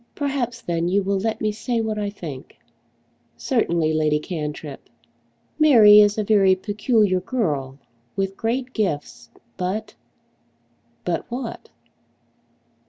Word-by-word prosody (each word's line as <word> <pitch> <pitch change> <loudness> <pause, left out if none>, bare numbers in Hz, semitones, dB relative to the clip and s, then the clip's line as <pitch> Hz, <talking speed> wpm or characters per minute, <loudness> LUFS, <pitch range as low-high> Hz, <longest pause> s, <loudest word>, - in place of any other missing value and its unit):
"Perhaps 255 -5 -2
then 170 0 -1
you 195 +3 +1
will 195 0 0
let 220 +2 -2
me 215 - +1
say 230 +3 -2
what 220 -1 -2
I 205 -1 -2
think." 155 -10 -9 0.8
"Certainly, 170 -10 0
Lady 155 -1 +2
Cantrip." 150 -3 -6 0.7
"Mary 225 -9 +8
is 205 0 +4
a 215 - 0
very 195 -3 +4
peculiar 205 0 +1
girl, 150 - -2 0.4
with 195 0 -2
great 250 +4 -2
gifts, 180 -10 -3 0.3
but 195 +4 -3 0.5
" 120 0 -41
"But 175 - -2
what?" 245 0 -6
200 Hz, 120 wpm, -22 LUFS, 160-225 Hz, 0.8 s, Mary